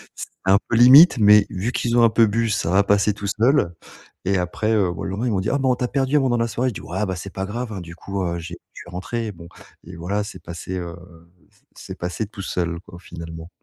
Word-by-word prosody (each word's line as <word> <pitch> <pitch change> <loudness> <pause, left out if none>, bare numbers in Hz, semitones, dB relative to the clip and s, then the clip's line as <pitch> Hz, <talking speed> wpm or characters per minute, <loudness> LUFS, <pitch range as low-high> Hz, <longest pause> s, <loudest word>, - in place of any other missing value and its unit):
C'était - - -8
un 95 +1 +5
peu - - +1
limite 130 +8 +8
mais 105 -1 +6
vu 100 +6 -2
qu'ils 120 -1 -1
ont - - +6
un 115 - +6
peu 115 +1 +4
bu 115 +2 0
ça 105 -5 -1
va 95 +2 +4
passer 100 +1 +2
tout 100 0 -6
seul 110 - +2 0.5
et 95 +1 +1
après, 95 +5 -1
heu, 100 -5 +2
bah, - - -8
le - - -3
lendemain 105 +6 -2
ils - - 0
m'ont 100 - 0
dit: 95 - -2
«Ah - - +1
bon 130 -1 +2
on - - +2
t'a 125 - -2
perdu 135 +1 0
un - - +5
moment 135 -2 +1
dans 120 - +1
la - - -1
soirée», 125 +3 -1
je 115 - -8
dis: - - -7
«Ouais, 95 +4 -3
bah, 95 -2 -3
c'est 95 +2 -8
pas 95 - -3
grave, 115 +4 -5
hein, 95 - -6
du 85 0 -10
coup, 95 +1 -4
heu, 85 -1 -2
j'ai 85 +1 -8 0.2
je - - -10
suis - - -14
rentré» 110 +5 -4
bon 85 -1 -12 0.4
et 90 +2 -10
voilà 100 +5 -2
c'est 100 -4 -10
passé, 85 +2 -6
heu, 85 -1 -6 0.6
c - - -31
c'est - - -9
passé 90 +5 -3
tout 100 -1 -9
seul, 85 -2 -2
quoi, 85 - -11
finalement. 80 -2 -9
100 Hz, 275 wpm, -22 LUFS, 90-115 Hz, 0.6 s, limite